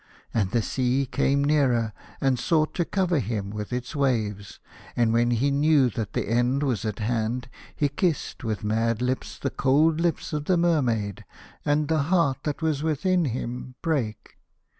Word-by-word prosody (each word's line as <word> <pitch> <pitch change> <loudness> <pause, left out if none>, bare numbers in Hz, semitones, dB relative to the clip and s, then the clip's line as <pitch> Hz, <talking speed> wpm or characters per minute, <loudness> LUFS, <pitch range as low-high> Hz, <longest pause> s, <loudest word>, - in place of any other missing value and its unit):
And 105 -5 +1
the 115 +2 +1
sea 130 +3 0
came 140 +2 +1
nearer, 130 -7 +2 0.3
and 135 -2 +1
sought 155 +4 +1
to 175 - 0
cover 180 -4 +1
him 105 -4 -3
with 105 +1 -5
its 125 +4 -4
waves, 110 -8 -1 0.4
and 115 -2 +2
when 120 +1 +3
he 120 +4 +1
knew 140 -3 +4
that 110 -1 -4
the - - -1
end 120 +5 +1
was 120 -7 -1
at 105 -2 -2
hand 115 +2 -1 0.3
he 145 - +2
kissed 155 -1 -2
with 110 -1 -3
mad 110 +1 +1
lips 125 +1 -2
the 140 - -3
cold 155 +4 +3
lips 170 -2 -1
of 150 -1 -2
the 180 +1 +3
Mermaid, 125 - +1 0.4
and 145 +1 +1
the 160 -1 +2
heart 165 -8 +2
that 150 +2 -3
was 155 -3 0
within 170 +3 +1
him 125 0 -4
brake. 130 -10 -2
130 Hz, 170 wpm, -25 LUFS, 115-150 Hz, 0.4 s, knew